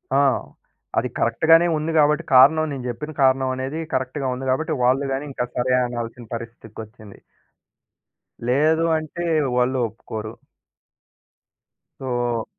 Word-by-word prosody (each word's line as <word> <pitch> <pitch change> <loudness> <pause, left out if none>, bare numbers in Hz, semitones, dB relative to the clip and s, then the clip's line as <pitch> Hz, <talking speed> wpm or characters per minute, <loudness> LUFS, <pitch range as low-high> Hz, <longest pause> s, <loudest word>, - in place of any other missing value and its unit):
ఆ! - - +5 0.8
అది - - +1
కరెక్ట్‌గానే 165 +9 +4
ఉంది 155 +2 -2
గాబట్టి, 150 +2 +3
కారణం 155 +5 +6
నేను 130 -2 -6
జెప్పిన 135 +6 -5
కారణమనేది 130 +2 +1
కరెక్ట్‌గా 130 +1 -2
ఉంది. 130 +1 -6
గాబట్టి, 155 +4 -1
వాళ్ళు 130 +3 +2
గాని 135 +2 -3
ఇంకా 125 - -2
సరే 125 +1 +1
అనాల్సిన 120 0 -6
పరిస్థితోచ్చింది. 110 -2 -11 1.3
లేదు 155 +6 +3
అంటే 155 +2 -6 0.3
వాళ్ళు 125 +1 +1
ఒప్పుకోరు. 110 0 -8 1.7
సో 120 -3 -2
130 Hz, 110 wpm, -22 LUFS, 120-150 Hz, 1.7 s, కారణం